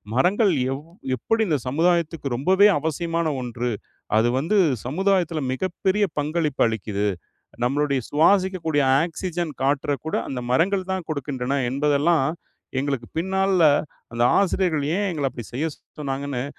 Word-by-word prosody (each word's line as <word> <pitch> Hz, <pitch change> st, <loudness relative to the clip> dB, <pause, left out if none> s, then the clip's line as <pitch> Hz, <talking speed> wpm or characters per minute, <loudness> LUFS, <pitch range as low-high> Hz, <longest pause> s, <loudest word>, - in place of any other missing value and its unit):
மரங்கள் 190 Hz, -, +3 dB, 0.2 s
எவ் 140 Hz, +3 st, -7 dB, 0.3 s
எப்படி 225 Hz, -, 0 dB
இந்த 155 Hz, -, +2 dB
சமுதாயத்துக்கு 160 Hz, -1 st, +1 dB
ரொம்பவே 190 Hz, +8 st, +5 dB
அவசியமான 165 Hz, +2 st, -1 dB
ஒன்று 120 Hz, 0 st, -3 dB, 0.5 s
அது 115 Hz, +2 st, +3 dB
வந்து 170 Hz, +9 st, +1 dB, 0.3 s
சமுதாயத்தில 175 Hz, +1 st, +1 dB
மிகப்பெரிய 190 Hz, +6 st, 0 dB
பங்களிப்பு 150 Hz, -1 st, 0 dB
அளிக்கிது. 105 Hz, -2 st, -2 dB, 0.6 s
நம்மளுடைய 140 Hz, +1 st, +1 dB
சுவாசிக்கக்கூடிய 165 Hz, -2 st, +2 dB, 0.2 s
ஆக்ஸிஜன் 175 Hz, -1 st, -4 dB
காற்ற 140 Hz, +1 st, +1 dB
கூட 160 Hz, -, -2 dB
அந்த 130 Hz, -, -4 dB
மரங்கள் 185 Hz, +7 st, +1 dB
தான் 190 Hz, -2 st, -2 dB
கொடுக்கின்றன 140 Hz, -2 st, -2 dB
என்பதெல்லாம் 145 Hz, +3 st, +2 dB, 0.5 s
எங்களுக்கு 135 Hz, -4 st, -2 dB
பின் 180 Hz, +4 st, -2 dB
நாள்ல 190 Hz, -2 st, +3 dB, 0.5 s
அந்த 120 Hz, +1 st, +1 dB, 0.2 s
ஆசிரியர்கள் 175 Hz, -6 st, +1 dB
ஏன் 205 Hz, -, 0 dB
எங்கள 145 Hz, -4 st, -1 dB
அப்டி 120 Hz, -, -8 dB
செய்ய 145 Hz, +6 st, -1 dB, 0.3 s
சொன்னாங்கன்னு 135 Hz, -2 st, -3 dB
155 Hz, 125 wpm, -23 LUFS, 135-180 Hz, 0.6 s, ரொம்பவே